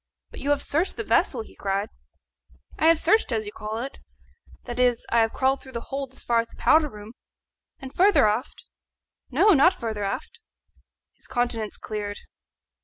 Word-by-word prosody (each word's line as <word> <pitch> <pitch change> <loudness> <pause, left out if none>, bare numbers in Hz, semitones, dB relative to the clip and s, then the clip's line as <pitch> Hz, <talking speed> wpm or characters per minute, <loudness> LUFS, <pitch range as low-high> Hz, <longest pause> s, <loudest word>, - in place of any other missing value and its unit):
"But - - -10
you 285 - -3
have 290 -1 +2
searched 325 +6 0
the - - -2
vessel?" 460 - +1
he - - -17
cried. 200 +2 -2 0.9
"I 315 - +4
have 330 0 +6
searched, 425 +1 +2
as 220 -2 -1
you 205 - -6
call 215 +1 -5
it 260 +4 -6 0.6
that 240 0 -6
is, 245 -2 +2
I 235 - +4
have 225 -1 +3
crawled 265 +1 +1
through 265 - -13
the 235 - -3
hold 275 -1 -3
as 260 - -7
far 235 -1 +2
as 230 - -1
the - - -18
powder 310 -1 +4
room." 210 -1 -11 0.6
"And 265 0 -10
further 390 - +5
aft?" 220 +5 -3 0.6
"No, 425 - +4
not 350 +3 +5
further 220 - -4
aft." 255 - -4 0.8
His - - -14
countenance 240 -4 -2
cleared. 205 -1 -5
245 Hz, 180 wpm, -25 LUFS, 220-290 Hz, 0.9 s, have